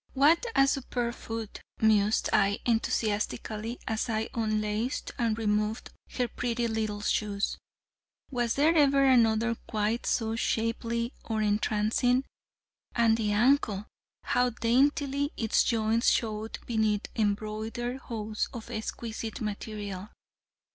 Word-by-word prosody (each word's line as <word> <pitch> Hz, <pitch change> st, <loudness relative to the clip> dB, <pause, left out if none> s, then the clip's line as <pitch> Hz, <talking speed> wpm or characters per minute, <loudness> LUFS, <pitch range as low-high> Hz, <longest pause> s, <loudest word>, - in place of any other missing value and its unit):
"What 315 Hz, -, +4 dB
a 275 Hz, -, +6 dB
superb 245 Hz, -3 st, -1 dB
foot!" 225 Hz, -2 st, -6 dB, 0.2 s
mused 215 Hz, -1 st, +3 dB
I 200 Hz, +1 st, +3 dB
enthusiastically, 220 Hz, 0 st, -1 dB
as 220 Hz, +1 st, -1 dB
I 220 Hz, 0 st, -1 dB
unlaced 215 Hz, +1 st, -1 dB
and 230 Hz, -2 st, +1 dB
removed 215 Hz, 0 st, -1 dB, 0.2 s
her 250 Hz, -1 st, 0 dB
pretty 240 Hz, 0 st, -2 dB
little 215 Hz, -2 st, -2 dB
shoes. 210 Hz, -1 st, -1 dB, 0.7 s
"Was 240 Hz, -3 st, 0 dB
there 300 Hz, +4 st, +4 dB
ever 280 Hz, -3 st, +4 dB
another 230 Hz, -3 st, +4 dB
quite 215 Hz, +2 st, -1 dB
so 225 Hz, -1 st, 0 dB
shapely 230 Hz, +1 st, -1 dB
or 220 Hz, -1 st, -1 dB
entrancing? 215 Hz, +4 st, +2 dB, 0.7 s
And 230 Hz, -2 st, +4 dB
the 215 Hz, -2 st, 0 dB
ankle! 215 Hz, -3 st, +2 dB, 0.4 s
How 250 Hz, 0 st, +2 dB
daintily 275 Hz, +4 st, +1 dB
its 225 Hz, -2 st, +2 dB
joints 225 Hz, 0 st, +2 dB
showed 220 Hz, -1 st, -1 dB
beneath 220 Hz, -3 st, +1 dB
embroidered 220 Hz, +3 st, -2 dB
hose 215 Hz, -4 st, -3 dB
of 235 Hz, 0 st, -7 dB
exquisite 225 Hz, 0 st, -5 dB
material." 205 Hz, -2 st, -5 dB
225 Hz, 115 wpm, -29 LUFS, 215-240 Hz, 0.7 s, a